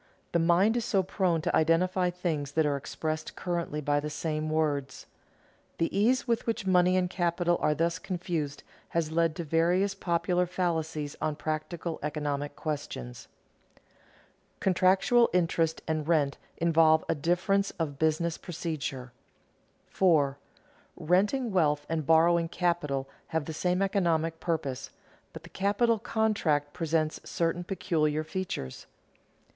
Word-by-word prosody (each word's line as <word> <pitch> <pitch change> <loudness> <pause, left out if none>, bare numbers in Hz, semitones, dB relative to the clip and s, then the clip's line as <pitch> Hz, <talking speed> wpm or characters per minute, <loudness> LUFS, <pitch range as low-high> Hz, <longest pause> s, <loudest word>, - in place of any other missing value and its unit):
The 170 - +2
mind 175 +7 +4
is 235 - 0
so 200 -4 +1
prone 180 -4 0
to 175 - +1
identify 180 +3 +2
things 160 -6 -3
that 160 0 +2
are 145 -1 +1
expressed 155 +3 -4
currently 170 -4 -3
by 145 0 +1
the 150 +1 -4
same 155 0 -3
words. 145 -4 -1 0.7
The 165 - -1
ease 245 +7 +2
with 235 -1 0
which 225 -3 -1
money 180 0 +4
and 180 -1 +2
capital 175 -1 0
are 150 0 +2
thus 170 +3 0
confused 170 -7 -3 0.3
has 160 -2 0
led 165 -1 +1
to 170 - -4
various 175 +5 +2
popular 175 -1 0
fallacies 160 -5 -2
on 155 - 0
practical 155 +3 -4
economic 145 -1 -3
questions. 145 - -5 1.3
[Sidenote: - - -39
Contractual 190 +6 +4
interest 165 -2 +1
and 155 -1 -1
rent 150 -4 +1 0.2
involve 160 -1 +4
a - - +2
difference 180 +6 +1
of 145 -4 -3
business 160 +1 +1
procedure] 150 -7 -5 0.7
4. 145 -7 +2 0.6
_Renting 205 - +1
wealth 150 -5 +2
and 160 -3 -2
borrowing 165 +1 +4
capital 150 -7 -1 0.2
have 160 -2 -2
the 160 - -5
same 180 +4 0
economic 165 -4 0
purpose, 140 -6 -3 0.4
but 160 - -10
the 170 - -12
capital 210 +5 +1
contract 200 -11 0
presents 155 -1 -1
certain 170 +1 -1
peculiar 155 -4 0
features. 155 - -5
165 Hz, 135 wpm, -29 LUFS, 155-180 Hz, 1.3 s, mind